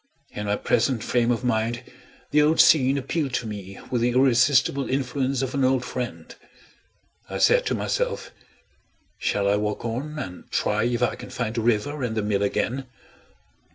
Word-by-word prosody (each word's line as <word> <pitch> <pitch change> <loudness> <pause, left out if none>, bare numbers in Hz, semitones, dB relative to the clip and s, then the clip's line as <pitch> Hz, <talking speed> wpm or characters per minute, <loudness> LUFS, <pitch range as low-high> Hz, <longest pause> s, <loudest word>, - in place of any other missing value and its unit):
In 105 0 -5
my 100 - +1
present 120 +1 +1
frame 120 -1 +1
of 120 0 0
mind, 115 0 0 0.5
the 150 +1 +5
old 155 +2 +3
scene 135 -2 +5
appealed 140 0 -2
to - - -2
me 100 -3 -7
with 120 -2 0
the 120 - +3
irresistible 130 +2 +3
influence 135 0 -1
of 130 - -3
an 140 -1 0
old 130 -1 +2
friend. 125 -1 -5 1.0
I - - -4
said - - +4
to - - 0
myself: - - -2 0.9
"Shall 100 -1 0
I 100 +1 +3
walk 105 +2 -3
on, 135 +7 -4
and 90 -10 -7
try 105 +2 0
if 120 0 0
I 120 - +2
can - - -9
find 115 -3 -3
the 115 - -1
river 120 +6 0
and 115 -3 -2
the 110 - 0
mill 105 -1 0
again?" 125 +6 -1
125 Hz, 175 wpm, -24 LUFS, 110-135 Hz, 1.0 s, the